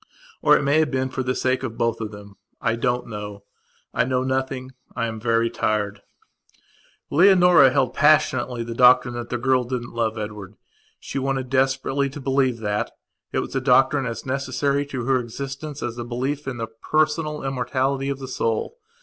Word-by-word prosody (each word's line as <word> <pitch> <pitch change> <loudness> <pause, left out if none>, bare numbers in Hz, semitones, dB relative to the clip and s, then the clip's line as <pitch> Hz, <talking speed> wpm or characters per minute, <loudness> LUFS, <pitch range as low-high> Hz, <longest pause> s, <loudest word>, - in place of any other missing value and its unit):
Or - - +6
it - - -2
may 140 +3 +3
have 155 -1 +2
been 130 -1 -1
for 130 - -3
the 130 0 -1
sake 130 0 0
of 120 -4 -5
both 115 -1 0
of 110 - -3
them. 100 -1 -12 0.2
I 115 - 0
don't 125 +1 -1
know. 105 -2 -7 0.5
I - - +2
know 130 +1 0
nothing. 130 0 -2 0.2
I 115 - -1
am 110 -1 -4
very 115 0 +2
tired. 105 -1 -1 1.1
Leonora 180 -3 +6
held 130 -2 +1
passionately 130 -5 +3
the 115 0 -5
doctrine 125 0 +5
that 120 0 -6
the 120 - -1
girl 130 +1 +2
didn't 120 -1 -5
love 115 -1 -1
Edward. 105 -2 -6 0.4
She 140 - -4
wanted 135 -1 -2
desperately 135 +1 +1
to 145 +2 -8
believe 135 -2 +1
that. 105 -1 -1 0.4
It - - 0
was - - -7
a 135 - +1
doctrine 135 +1 +3
as 115 -1 -5
necessary 140 +1 -1
to 130 -4 -4
her 130 0 +3
existence 135 +5 -6
as 120 0 -4
a - - -3
belief 130 +5 -3
in 130 -3 -3
the 115 - -2
personal 150 +6 -1
immortality 135 +1 -1
of 140 - -2
the 135 -1 -7
soul. 120 - -2
130 Hz, 185 wpm, -23 LUFS, 115-135 Hz, 1.1 s, Or